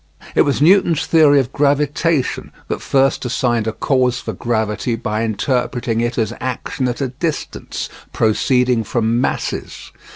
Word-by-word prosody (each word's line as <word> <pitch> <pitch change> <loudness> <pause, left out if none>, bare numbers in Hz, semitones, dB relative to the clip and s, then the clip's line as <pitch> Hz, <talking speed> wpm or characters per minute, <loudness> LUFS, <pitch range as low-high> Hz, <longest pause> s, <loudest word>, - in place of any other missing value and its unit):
It - - +4
was 145 0 +2
Newton's 175 -2 +4
theory 150 -3 +5
of 130 -1 -2
gravitation 145 +1 0 0.2
that - - -3
first 135 0 +1
assigned 120 -2 0
a - - +1
cause 125 0 +1
for - - -5
gravity 110 0 -1
by 110 -1 -2
interpreting 115 +1 -1
it 120 +1 -2
as 115 -1 0
action 130 0 -3
at 125 +3 -3
a 135 - -1
distance, 150 +5 -4 0.2
proceeding 125 +2 +2
from 115 +2 0
masses. - - -3
125 Hz, 140 wpm, -18 LUFS, 115-140 Hz, 0.2 s, theory